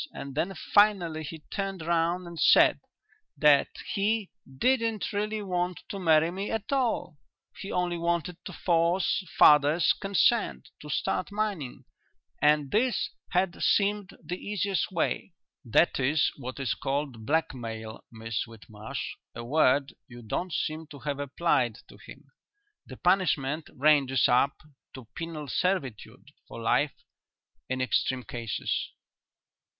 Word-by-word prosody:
And 140 0 -7
then 175 +7 -1
finally 185 -7 +3
he 155 +1 -7
turned 195 -4 -3
round 170 +2 +1
and 170 -1 -8
said - - +6 0.6
that 145 -2 +5 0.3
he 210 0 0 0.3
didn't 230 - +1
really 210 +1 -2
want 180 -2 -2
to 200 - -5
marry 160 -2 +4
me 195 +3 -4
at 225 +2 -3
all; 240 - -1 0.4
he 195 - -7
only 175 -1 -1
wanted 170 +1 -2
to - - -6
force 175 +3 +1
father's 150 +3 +6
consent 200 +3 +1
to 150 - -10
start 180 +6 -1
mining 200 -11 -3 0.6
and 150 -1 +3
this 240 +3 +1 0.2
had 180 -1 0
seemed 205 -1 +1
the 180 - -4
easiest 200 -3 -1
way." 170 +1 -1 0.3
"That 130 +7 +3
is 145 +3 +2
what 130 0 -7
is 135 - 0
called 135 -5 -3
blackmail, 115 -8 -2
Miss 115 -1 -4
Whitmarsh; 110 -1 -7 0.2
a 115 - -6
word 140 +1 +2
you 120 -2 -12
don't 175 - -3
seem 155 +1 -3
to 145 -2 -11
have 145 -2 -3
applied 135 -5 0
to - - -14
him. - - -14 0.6
The - - -10
punishment 160 -5 +1
ranges 135 -3 +4
up 130 +3 +2 0.3
to 130 -3 -10
penal 165 -3 -6
servitude 140 - -2 0.2
for - - -9
life - - +1 0.7
in 130 0 -1
extreme 130 0 0
cases." 115 -3 -3
160 Hz, 130 wpm, -28 LUFS, 135-190 Hz, 0.7 s, said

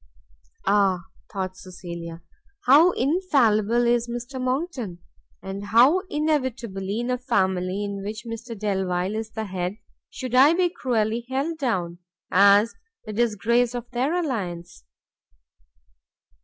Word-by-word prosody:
Ah! 195 -3 +3 0.3
thought 185 -2 -4
Cecilia, 170 -3 -8 0.4
how 300 +7 +7
infallible 240 - +2
is 240 0 +2
Mr 240 +2 -5
Monckton! 255 - -2 0.5
and 195 +1 -6
how 240 - +5
inevitably, 240 -10 -1
in 245 +1 -2
a 250 - -1
family 190 -4 0
of 200 -1 -5
which 215 +3 -6
Mr 230 0 -7
Delvile 190 -2 -1
is 220 0 -4
the 220 0 -5
head, 185 0 -3 0.3
should 255 -2 -6
I 275 +6 +6
be 360 0 +2
cruelly 235 -6 -1
held 290 +5 -2
down, 180 -10 -1 0.3
as 200 +4 +5 0.3
the 215 - -6
disgrace 235 +2 +1
of 240 0 -6
their 260 +7 0
alliance! 180 - -4
225 Hz, 120 wpm, -24 LUFS, 195-255 Hz, 0.5 s, how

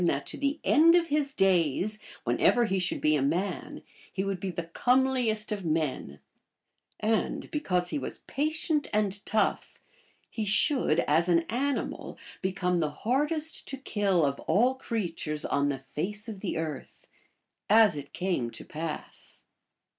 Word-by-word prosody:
that 140 -3 0
to - - -6
the 285 +2 -1
end 330 +3 +6
of 340 -1 +2
his 290 -1 +1
days, 190 +2 +2 0.2
whenever 240 -1 +3
he 195 -3 0
should 180 - -1
be 155 0 +3
a 145 - +1
man, 175 +9 -2 0.3
he 190 - -2
would 195 -2 -2
be 190 - -3
the 170 -1 -4
comeliest 245 +3 +1
of 205 -2 -2
men; 155 - -2 0.8
and 220 +1 -1
because 180 -12 0
he 295 - -1
was - - -5
patient 310 +1 -1
and 205 -1 0
tough, 215 0 0 0.5
he 220 - -4
should, 205 - +2
as 165 +4 +2
an 170 -1 +5
animal, 275 +4 -2 0.2
become 180 -1 0
the 155 -2 +1
hardest 295 - -1
to 270 - -3
kill 200 - +1
of 140 0 -1
all 245 +6 +4
creatures 175 -12 -3
on 140 0 +1
the 140 - -1
face 190 - -5
of 215 -4 -6
the 190 -4 -3
earth, 155 -3 -6 0.6
as 215 -4 +6
it 145 -1 -7
came 175 -10 -1
to - - -9
pass. 155 0 -7
195 Hz, 155 wpm, -28 LUFS, 165-250 Hz, 0.8 s, end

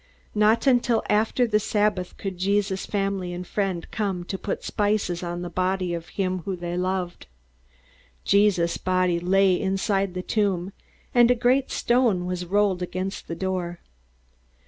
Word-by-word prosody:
Not 215 +3 +3
until 245 -3 +3
after 220 +4 +2
the 210 -2 +2
Sabbath 210 -3 0
could 190 -3 -5
Jesus' 195 0 0
family 195 -3 -2
and 180 +1 -5
friends 190 -3 -2
come 195 -5 -2
to 190 +2 -4
put 200 - -4
spices 205 -4 0
on 175 0 -4
the - - -4
body 185 -1 0
of 170 -1 -5
him 185 -2 0
whom 190 +2 -4
they 175 0 -4
loved. 180 -1 -2 1.0
Jesus' 200 -5 +3
body 185 -2 +1
was 175 +1 -6
laid 195 -1 +4
inside 195 0 0
the 180 - -3
tomb, 195 -3 0 0.4
and 240 -1 +6
a 250 - +5
great 255 +3 +2
stone 235 -7 +2
was 180 -1 -3
rolled 200 -1 +2
against 185 +2 -4
the 165 - -4
door. 180 -1 -3
190 Hz, 155 wpm, -25 LUFS, 180-210 Hz, 1.0 s, and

